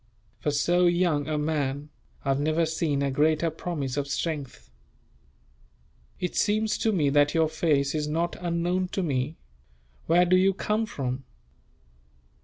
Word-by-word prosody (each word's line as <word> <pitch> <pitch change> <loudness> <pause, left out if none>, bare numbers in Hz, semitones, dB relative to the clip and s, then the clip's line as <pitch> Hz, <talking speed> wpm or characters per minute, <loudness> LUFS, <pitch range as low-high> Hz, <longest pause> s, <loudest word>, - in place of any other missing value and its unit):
For - - -1
so 175 +5 +3
young 175 -4 +1
a 155 -1 -1
man, 150 -1 -2 0.4
I - - -1
have 135 0 +2
never 155 +3 +1
seen 155 -3 -1
a 140 - 0
greater 155 +4 +2
promise 150 -5 -4
of 140 -1 -1
strength. 140 - -4 1.5
"It 180 - -3
seems 215 0 +1
to 225 - +2
me 150 -8 +2
that 145 +1 +3
your 160 -1 +4
face 150 -3 +1
is 150 -1 -1
not 165 +3 -1
unknown 175 +1 0
to 195 - 0
me. 140 0 -1 0.7
Where 175 +2 +5
do 180 +1 +4
you 190 +1 +3
come 215 +3 -1
from?" 130 - -4
155 Hz, 150 wpm, -26 LUFS, 145-175 Hz, 1.5 s, Where